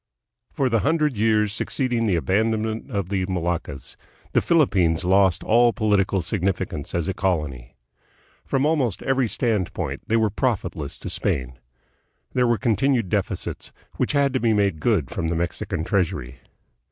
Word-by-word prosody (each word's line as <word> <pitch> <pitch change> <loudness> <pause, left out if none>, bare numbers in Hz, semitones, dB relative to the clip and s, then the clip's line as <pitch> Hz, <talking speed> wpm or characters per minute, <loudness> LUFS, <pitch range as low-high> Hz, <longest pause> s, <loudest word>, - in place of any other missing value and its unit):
For 135 - 0
the 115 -2 +2
hundred 150 0 +1
years 105 -1 +2
succeeding 120 -1 -1
the 95 - +2
abandonment 110 - 0
of 100 -7 -3
the 95 -2 0
Moluccas, 85 -7 -3 0.4
the - - +3
Philippines 95 - +2
lost 95 -1 +3
all 120 +1 +4
political 100 -3 +1
significance 90 -5 -2
as 85 -2 -1
a 95 - -1
colony. 75 -10 -2 0.7
From 135 +1 0
almost 140 - 0
every 135 -2 +1
standpoint 110 -5 -1
they 115 - +2
were 110 -2 +2
profitless 95 - -2
to - - -7
Spain. 65 -1 -2 0.7
There 125 -1 +2
were 120 -1 +2
continued 125 -2 +1
deficits, - - -3 0.3
which - - 0
had 140 -2 +2
to 130 - +1
be 115 -2 +2
made 100 -6 +1
good 95 - +1
from 80 - -2
the 85 - -1
Mexican 80 -1 -2
treasury. 90 - -1
100 Hz, 150 wpm, -23 LUFS, 85-120 Hz, 0.7 s, all